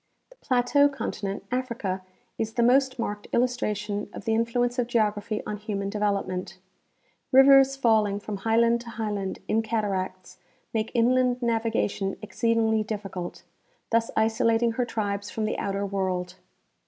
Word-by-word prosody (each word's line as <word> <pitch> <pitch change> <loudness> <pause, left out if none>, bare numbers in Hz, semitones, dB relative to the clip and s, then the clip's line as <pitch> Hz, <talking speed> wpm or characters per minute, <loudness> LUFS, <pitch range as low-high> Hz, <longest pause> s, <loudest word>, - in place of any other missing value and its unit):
The - - -17
plateau 275 - +3
continent, 205 -7 -4
Africa, 235 -7 -2 0.4
is 220 0 -2
the 235 - +2
most 260 +2 +3
marked 210 -3 -4
illustration 210 -4 -1
of - - -8
the 225 - +1
influence 240 +2 0
of 240 - +1
geography 215 -2 0
on 210 - -4
human 200 -1 -3
development. 195 -3 -2 0.7
Rivers 270 0 +7
falling 220 -6 +2
from 205 0 -5
highland 230 +3 +2
to 235 - -10
highland 210 -4 -3
in 220 - +2
cataracts 190 -5 -3 0.3
make 220 0 -1
inland 250 +1 +2
navigation 225 -4 0
exceedingly 220 +1 +1
difficult, 200 -4 -5 0.5
thus 230 0 +2
isolating 225 +1 +2
her 245 +1 -1
tribes 205 -3 -3
from 220 - -2
the 215 - -2
outer 200 0 -2
world. 185 -2 -2
220 Hz, 135 wpm, -26 LUFS, 200-235 Hz, 0.7 s, Rivers